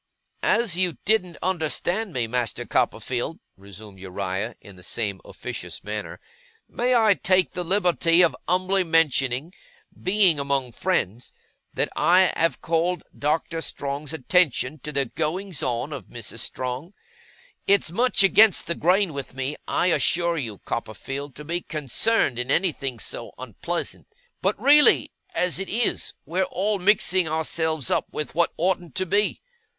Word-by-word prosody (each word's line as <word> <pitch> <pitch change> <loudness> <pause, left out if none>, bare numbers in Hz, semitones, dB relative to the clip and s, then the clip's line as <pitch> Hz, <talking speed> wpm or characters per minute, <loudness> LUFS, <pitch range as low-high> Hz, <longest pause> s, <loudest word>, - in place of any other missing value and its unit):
'As 230 -7 +2
you 180 -6 +2
didn't 185 -5 +1
understand 185 +4 -1
me, 125 -6 -1
Master 120 0 -2
Copperfield,' 130 +6 -1 0.2
resumed 100 0 -13
Uriah 95 +4 -4
in 100 -3 -14
the 90 - -15
same 100 +1 -3
officious - - -7
manner, 105 +1 -6 0.5
'I - - -32 0.2
may 225 -4 +5
take 185 -1 +2
the 180 -1 -3
liberty 175 -2 +3
of 170 - +2
umbly 185 +2 +2
mentioning, 155 -2 +1 0.5
being 185 -5 +3
among 140 -3 -1
friends, 120 - -2 0.4
that - - +1
I 185 +1 +4
have 165 +1 0
called 170 +2 0
Doctor 160 +2 -1
Strong's 140 -1 -4
attention 155 -2 +1
to 150 - -5
the 140 -1 0
goings 165 +6 -3
on 125 +4 -2
of 130 -9 -8
Mrs. - - -7
Strong. 130 +9 -4 0.7
It's 200 -4 +3
much 240 +2 +3
against 210 0 +5
the 170 - -1
grain 180 +1 +2
with 140 -2 -7
me, 135 +2 -3
I 180 - +1
assure 170 0 +2
you, 110 -7 -5
Copperfield, 135 +5 -5
to 150 - -9
be 170 +3 -2
concerned 150 - 0
in 125 +1 -3
anything 140 -6 0
so 105 - -6
unpleasant; - - -5 0.3
but 195 +2 0
really, 290 +5 +7 0.2
as 180 - 0
it 195 - -4
is, 235 +2 0
we're 180 +4 -1
all 200 +3 -1
mixing 185 -2 +3
ourselves 160 -2 -1
up - - +1
with 150 - -4
what 170 +1 +2
oughtn't 175 -1 -1
to 185 - 0
be. 205 +3 0
165 Hz, 145 wpm, -24 LUFS, 130-185 Hz, 0.7 s, really